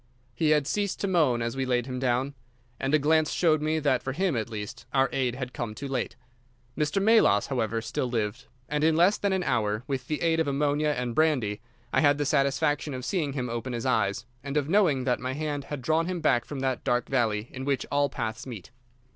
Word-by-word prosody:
He 155 +6 +1
had 150 -2 +3
ceased 200 +5 -1
to 200 - 0
moan 150 -11 +2
as 115 +1 -3
we 135 - -1
laid 125 -2 0
him 125 -1 -4
down, 130 +2 0 0.5
and 135 - -1
a 155 - +6
glance 155 +1 +2
showed 155 -3 +2
me 155 +1 +1
that 140 -5 +1
for 135 - -3
him 180 0 0
at 110 -1 -2
least 105 -2 -7
our 135 0 +4
aid 125 -3 0
had 125 -1 -5
come 110 -2 -4
too 140 - -5
late. 130 -3 -2 0.6
Mr. 150 +5 0
Melas, 195 - +4
however, 115 -4 -1
still 115 +3 -2
lived, 115 +2 -2 0.2
and 150 +2 -1
in 160 0 +4
less 180 +5 +4
than 200 - 0
an 190 -1 0
hour, 110 -5 0
with 135 -3 -3
the 155 +1 -2
aid 165 -1 +2
of 160 - +1
ammonia 145 +2 +1
and 125 -1 -2
brandy 125 -9 +1 0.3
I - - +4
had 145 -1 +4
the 145 - -1
satisfaction 145 +1 +1
of 130 0 -6
seeing 155 -6 -1
him 125 -3 -2
open 120 +2 -4
his 115 +1 -3
eyes, 105 -4 +1 0.2
and 140 +1 -3
of 145 -2 +1
knowing 165 -8 +3
that 125 -1 +1
my 130 +1 -3
hand 145 -1 -3
had 140 -2 -6
drawn 160 +3 +1
him 180 -1 -2
back 130 -7 +2
from 140 -3 -6
that 130 -2 -1
dark 125 -2 +1
valley 115 -4 0
in 130 - -6
which 140 -1 0
all 145 0 +2
paths 115 -2 -4
meet. 110 -8 -8
135 Hz, 230 wpm, -27 LUFS, 120-155 Hz, 0.6 s, a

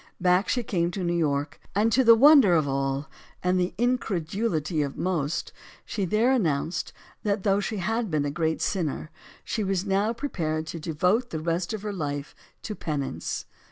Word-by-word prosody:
Back 180 +2 +3
she 245 - +1
came 170 -5 0
to 185 +1 -4
New 175 0 0
York. 145 -3 -1 0.2
And 215 +3 +3
to 260 +4 +4
the 230 -1 +8
wonder 265 - +7
of 155 -3 +2
all, 135 +1 -1 0.4
and 180 0 +2
the 180 0 -1
incredulity 195 - 0
of 140 -1 -3
most 170 -4 -1 0.3
she 200 -3 -2
there 215 +8 +2
announced 170 - 0 0.3
that, 200 -2 -1
though 200 -1 +3
she 210 +1 -3
had 220 +4 -1
been 150 -3 0
a 145 - -1
great 160 +1 -1
sinner, 160 -4 -2 0.3
she 215 - -2
was 195 -1 -1
now 200 +2 +1
prepared 165 - -2
to 165 +1 -6
devote 180 +10 +1
the 160 - -4
rest 170 +2 -1
of 215 -2 -4
her 210 -1 -3
life 145 -5 -4 0.3
to 215 - -4
penance. 150 -8 -3
180 Hz, 180 wpm, -26 LUFS, 155-215 Hz, 0.4 s, the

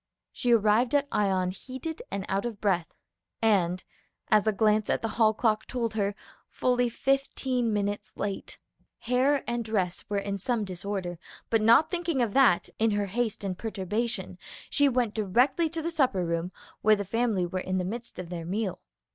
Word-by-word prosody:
She 245 - 0
arrived 230 +3 +4
at 285 0 +2
Ion 190 -3 +1
heated 260 - -7
and 195 -1 -3
out 195 +1 0
of 220 -4 -7
breach, 180 -5 +1 0.5
and, 185 -5 +2 0.5
as 215 0 +4
a - - +5
glance 215 +1 +2
at - - 0
the 225 - 0
hall 220 -1 +3
clock 220 -1 0
told 235 -3 -2
her, 205 -2 -1 0.3
fully 245 -1 +1
fifteen 260 -2 0
minutes 205 -1 -2
late. 200 -1 -4 0.4
Hair 260 +4 +2
and 240 0 -2
dress 195 -5 -1
were 205 - 0
in 200 0 -2
some 230 0 0
disorder, 185 -2 -4 0.3
but 225 -1 +3
not 235 +9 +5
thinking 345 -5 -1
of 230 -5 +1
that, 260 -10 +4
in 225 +1 +3
her 205 - 0
haste 220 +1 -2
and 190 -2 -2
perturbation, 220 +2 -3 0.3
she 285 -1 +5
went 245 -4 0
directly 245 - +2
to 325 0 -4
the 335 - -1
supper 255 - +1
room, 170 +1 -2 0.3
where 215 0 +5
the 200 -1 -4
family 220 -3 0
were 185 +2 -3
in 185 0 -2
the 180 - -1
midst 230 +5 -6
of 180 -2 -6
their 175 -2 -5
meal. 190 +2 -2
215 Hz, 180 wpm, -28 LUFS, 195-245 Hz, 0.5 s, a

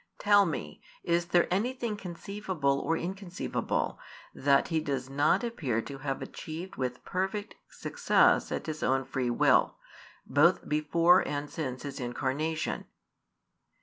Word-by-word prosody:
Tell 205 -1 +5
me, 75 - -5 0.2
is 170 0 +1
there 175 0 +3
anything 235 +2 -1
conceivable 180 -6 -2
or 165 +3 0
inconceivable 185 0 -3 0.3
that 140 0 +3
He 165 -2 +1
does 135 -4 -3
not 150 - +3
appear 150 - -1
to 140 -1 -8
have 135 -1 -3
achieved 165 +4 -7
with 125 -1 -4
perfect 190 +3 -2 0.2
success - - +2
at - - -3
His 155 -1 -5
own 135 0 +1
free 130 -2 -1
will, 120 - +3 0.5
both 155 +7 +3
before 165 +4 +4
and 145 0 -3
since 130 -5 -4
His 140 -1 -6
Incarnation? 140 +6 -2
155 Hz, 130 wpm, -29 LUFS, 135-185 Hz, 0.5 s, Tell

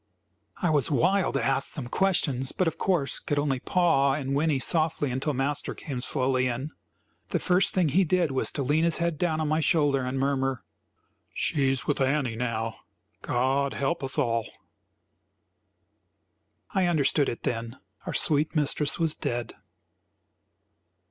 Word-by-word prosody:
I 175 - +3
was 145 -1 +1
wild 180 +7 +2
to - - 0
ask 135 0 0
some 140 -6 -4
questions, 140 -7 +1
but 185 - 0
of 165 - -3
course 175 -7 0
could 145 - -3
only 145 -3 0
paw 150 -5 +2
and 135 -2 -3
whinny 150 0 +1
softly 155 -1 +1
until 135 +3 -2
Master 140 +3 -2
came 130 -5 -6
slowly 130 -1 +1
in. 130 +5 -4 0.6
The - - 0
first 185 +1 +1
thing 180 -5 +2
he 185 +8 +3
did 175 -3 +1
was 130 - +1
to 140 - -2
lean 150 +5 +1
his 170 -1 +3
head 170 -3 -1
down 160 -3 0
on 155 - -1
my 155 +1 +1
shoulder 145 -4 +2
and 130 +1 -3
murmur. 135 -1 -1 0.7
"She's 135 -2 0
with 145 - -1
Annie 135 -3 +1
now; 115 -2 -3 0.4
God 135 +3 0
help 140 +3 -1
us 135 -1 -1
all!" 115 -1 0 2.3
I 190 -2 +2
understood 150 -3 +2
it 120 - -6
then; 115 +1 -3 0.3
our - - -3
sweet 155 +2 +1
mistress 150 0 +1
was 165 -2 +1
dead. 120 -5 -4
140 Hz, 155 wpm, -27 LUFS, 130-160 Hz, 2.3 s, I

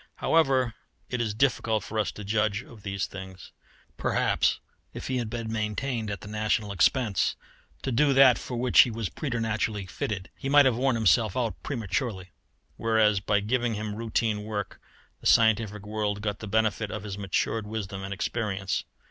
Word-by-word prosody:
However, 135 -7 +2 0.4
it 125 -1 -1
is 110 -3 -2
difficult 115 -3 +1
for 110 - -3
us 105 -5 0
to 105 - -8
judge 110 +1 0
of 115 -3 -14
these 100 -1 -2
things. 95 -1 -10 0.5
Perhaps - - +1 0.4
if - - -6
he 130 - 0
had 115 -3 -3
been 115 -1 -4
maintained 110 +2 -2
at 100 -2 -5
the - - -9
national 105 0 0
expense 100 - +2 0.5
to 135 - -1
do 140 +4 +3
that 135 -2 +7
for 125 - -5
which 125 +1 +3
he 125 - +9
was 115 -3 -3
preternaturally 115 -6 -2
fitted, 95 +1 -4
he 135 - -4
might 145 0 +7
have 130 -3 +3
worn 130 +1 +1
himself 110 +2 +3
out 115 -7 -2
prematurely; 100 -5 -3 0.5
whereas 110 -3 +3
by 100 0 +1
giving 120 +2 0
him 105 0 -4
routine 110 -1 -1
work 105 -2 -5 0.4
the - - -2
scientific 110 -2 +3
world 105 -1 -2
got 105 -1 -2
the 105 - -7
benefit 110 0 +1
of 100 - -5
his 100 -2 -5
matured 100 +2 -1
wisdom 100 -3 -4
and 95 +1 -6
experience. 100 -1 -2
110 Hz, 175 wpm, -27 LUFS, 100-120 Hz, 0.5 s, he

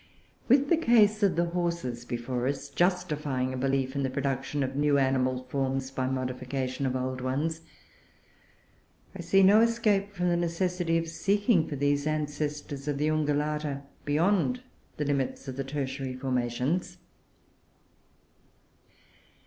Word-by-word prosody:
With 275 +3 +4
the 340 - +5
case 220 -7 +4
of 200 -3 +3
the 170 +1 +2
Horses 170 -9 -2
before 120 +1 -2
us, 140 0 -3
justifying 150 -6 0
a - - -3
belief 135 0 0
in 140 - 0
the 135 - 0
production 135 +1 -2
of 135 0 -3
new 145 0 +3
animal 130 -1 +1
forms 135 0 -2
by 130 -1 -2
modification 130 +1 -2
of 130 - -1
old 130 0 -2
ones, 150 +6 -1 1.5
I 190 - -5
see 195 +3 +4
no 205 +3 +7
escape 215 -4 +2
from 180 -2 -1
the 175 - +2
necessity 170 0 0
of 165 0 -2
seeking 200 +1 +2
for 145 - -4
these 145 +1 +1
ancestors 150 -2 -3
of 145 -1 -1
the 150 +2 +1
Ungulata 150 -1 -1 0.2
beyond 190 +11 +1 0.3
the 150 - -1
limits 140 -1 -1
of 130 - -5
the 135 - -2
Tertiary 135 -1 -4
formations. 130 +7 -1
145 Hz, 140 wpm, -28 LUFS, 130-175 Hz, 1.5 s, no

